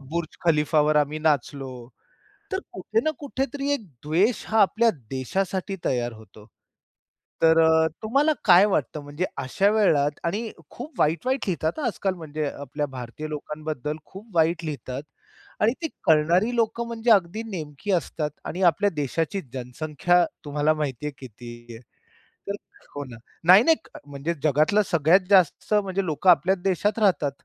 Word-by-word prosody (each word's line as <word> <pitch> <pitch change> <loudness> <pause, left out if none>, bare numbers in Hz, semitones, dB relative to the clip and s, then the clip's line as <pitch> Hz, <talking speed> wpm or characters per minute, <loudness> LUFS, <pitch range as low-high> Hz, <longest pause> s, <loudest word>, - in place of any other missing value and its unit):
बुर्ज 155 +4 -5
खलीफावर 150 -1 +3
आम्ही 150 +1 +1
नाचलो. 135 -5 -2 0.6
तर 380 - 0
कुठे 450 - -1
ना 315 - +1
कुठेतरी 280 0 -3
एक 250 -7 -3 0.2
द्वेष 180 +10 +1
हा 220 -1 +3
आपल्या 230 +4 +4 0.2
देशासाठी 190 +9 -2
तयार 120 -2 0
होतो. 110 -1 -15 1.0
तर 165 0 +5
अ, 160 0 +4 0.2
तुम्हाला 275 +8 +2
काय 185 0 +7
वाटतं? 155 -6 -1
म्हणजे 145 +5 -3
अशा 140 +9 +1
वेळात 150 -9 +2
आणि 210 +6 -2 0.2
खूप 290 +6 -10
वाईट-वाईट 210 - +1
लिहितात, 165 - -1
हा 290 - -2
आजकाल 195 -4 -1
म्हणजे 155 -2 -4
अ, 140 - -3
आपल्या 145 +2 -3
भारतीय 130 +3 -7
लोकांबद्दल 150 -1 -5
खूप 210 +4 -12
वाईट 165 +1 +2
लिहितात 135 -2 -5 0.6
आणि 220 +3 +4
ती 320 - -1 0.2
कळणारी 175 +9 +3
लोकं 230 +1 0
म्हणजे 230 0 0
अगदी 200 +2 +3
नेमकी 155 +2 -5
असतात 160 -4 -1 0.2
आणि 180 - -4
आपल्या 205 +6 0
देशाची 160 +7 -2
जनसंख्या 150 +7 0 0.2
तुम्हाला 150 +1 +1
माहिती 150 -3 -4
आहे 150 - -3
किती 120 -1 -10 0.2
आहे? 115 - -11 0.7
तर 200 - -1 0.4
हो 145 - -3
ना. 120 -3 -11 0.3
नाही-नाही 215 - +7 0.3
म्हणजे 145 +4 -3
जगातला 155 +8 +3
सगळ्यात 170 +4 +4
जास्त 190 +1 +3
म्हणजे 195 -2 +1
लोकं 165 +3 +1
आपल्याच 185 +2 +4
देशात 200 +3 0
राहतात. 185 -9 +2
165 Hz, 145 wpm, -24 LUFS, 145-200 Hz, 1.0 s, काय